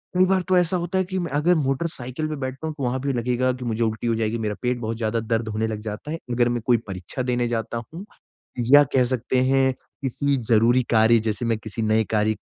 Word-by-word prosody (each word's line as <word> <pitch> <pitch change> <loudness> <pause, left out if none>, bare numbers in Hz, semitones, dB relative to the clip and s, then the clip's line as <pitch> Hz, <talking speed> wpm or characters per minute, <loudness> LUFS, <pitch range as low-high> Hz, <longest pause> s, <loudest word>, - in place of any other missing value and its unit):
कई 185 +1 +5
बार 190 0 +2
तो 185 - +4
ऐसा 180 +1 +2
होता 175 +2 -2
है 190 - +3
कि 190 +1 -4
मैं 170 -4 -3
अगर 150 +5 +3
मोटर 140 +1 0
साइकिल 130 0 -5
पे 155 - -3
बैठता 135 +2 -5
हूँ 155 - -3
तो 140 - -4
वहाँ 125 +1 0
भी 140 0 -1
लगेगा 125 +1 0
की 125 0 -7
मुझे 115 0 -1
उल्टी 110 +1 -2
हो 115 - +2
जाएगी, 110 0 -1
मेरा 105 -2 -2
पेट 125 0 0
बहुत 115 -1 -3
ज़्यादा 115 0 -1
दर्द 115 0 -1
होने 110 +1 -1
लग 110 -1 -4
जाता 105 +7 -6
है। 165 - -2
अगर 120 0 +2
मैं 120 -1 -1
कोई 120 -2 +4
परीक्षा 95 +5 -5
देने 125 -1 0
जाता 115 0 -3
हूँ 180 +5 -7 0.7
या 145 +1 +9
कह 130 - +4
सकते 125 +1 0
हैं 135 -1 +3 0.3
किसी 140 +1 0
ज़रूरी 120 +3 +4
कार्य 115 0 +5
जैसे 110 +3 -2
मैं 115 -1 +1
किसी 110 +1 -6
नए 110 0 +2
कार्य 110 0 +2
120 Hz, 245 wpm, -23 LUFS, 115-140 Hz, 0.7 s, या